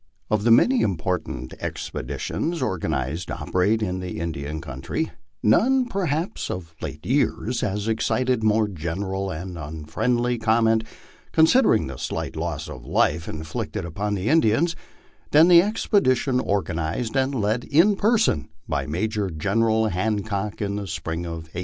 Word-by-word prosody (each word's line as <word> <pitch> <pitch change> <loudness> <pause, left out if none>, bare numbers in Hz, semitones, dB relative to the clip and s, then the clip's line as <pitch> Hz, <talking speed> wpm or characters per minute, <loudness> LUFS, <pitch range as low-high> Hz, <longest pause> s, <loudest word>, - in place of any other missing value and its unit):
Of 105 -1 +2
the 120 - +3
many 240 - +5
important 90 - -2
expeditions 170 +1 -3
organized 80 - -2
to - - -4
operate 105 +5 +1
in 95 -2 -2
the 90 -3 -5
Indian 80 -2 -4
country, 70 -5 -4 0.3
none, 255 - +4
perhaps, 175 - -2
of 85 -2 -5
late - - -6
years - - 0
has 100 +2 -2
excited 125 +2 +1
more 110 0 +3
general 95 +2 -3
and 90 +1 -6
unfriendly 120 +11 -1
comment, 110 0 +3 0.5
considering 160 - +5
the 65 -1 -7
slight - - -4
loss - - -3
of 65 - -9
life 80 +5 +1
inflicted 80 +1 -4
upon 100 +5 -2
the 95 +2 -3
Indians, 160 +3 +3 0.5
than 160 +4 +6
the 170 -1 +9
expedition 145 - +2
organized 95 0 -1
and 135 +1 +1
led 110 +1 0
in 175 +8 +4
person 220 - +2 0.2
by 70 -1 -1
Major 100 +5 -1
General 110 +7 +1
Hancock 105 +1 -2
in 100 0 -2
the 100 -1 -4
spring 80 +1 -4
of 85 -1 -5
1867. 90 - -4
105 Hz, 140 wpm, -24 LUFS, 85-125 Hz, 0.5 s, the